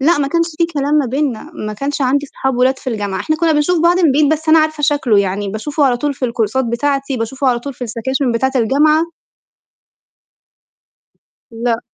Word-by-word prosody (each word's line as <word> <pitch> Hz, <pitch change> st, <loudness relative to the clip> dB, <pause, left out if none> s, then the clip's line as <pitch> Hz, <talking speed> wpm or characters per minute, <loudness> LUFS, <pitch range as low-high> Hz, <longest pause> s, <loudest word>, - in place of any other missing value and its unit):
لأ، 325 Hz, +5 st, +3 dB
ما 275 Hz, -1 st, 0 dB
كانش 335 Hz, +2 st, +1 dB
في 335 Hz, -, +3 dB
كلام 285 Hz, +1 st, 0 dB
ما 290 Hz, -4 st, +3 dB
بيننا، 275 Hz, +1 st, -2 dB, 0.2 s
ما 215 Hz, -, -3 dB
كانش 280 Hz, +7 st, -4 dB
عندي 280 Hz, +2 st, +1 dB
صحاب 265 Hz, -2 st, -3 dB
ولاد 260 Hz, +1 st, +2 dB
في 255 Hz, -, -5 dB
الجامعة، 205 Hz, -4 st, -3 dB
إحنا 310 Hz, 0 st, -1 dB
كنّا 330 Hz, -1 st, +2 dB
بنشوف 310 Hz, +3 st, +1 dB
بعض 345 Hz, +2 st, +4 dB
من 320 Hz, -7 st, +4 dB
بعيد، 295 Hz, +1 st, +3 dB
بس 315 Hz, +1 st, -3 dB
أنا 320 Hz, +1 st, +7 dB
عارفة 310 Hz, -1 st, 0 dB
شكله، 280 Hz, -8 st, +2 dB
يعني 200 Hz, +1 st, -1 dB
باشوفه 285 Hz, +9 st, -1 dB
على 250 Hz, -3 st, +2 dB
طول 285 Hz, +3 st, -2 dB
في 260 Hz, -, -4 dB
الكورسات 235 Hz, +2 st, 0 dB
بتاعتي، 275 Hz, +3 st, -1 dB
باشوفه 260 Hz, +4 st, -3 dB
على 245 Hz, -2 st, +2 dB
طول 275 Hz, +2 st, -7 dB
في 250 Hz, -, -6 dB
السكاشن 245 Hz, +3 st, -2 dB
بتاعة 265 Hz, +3 st, 0 dB
الجامعة 295 Hz, +7 st, +3 dB, 2.5 s
لأ. 230 Hz, 0 st, -1 dB
270 Hz, 195 wpm, -16 LUFS, 235-300 Hz, 2.5 s, أنا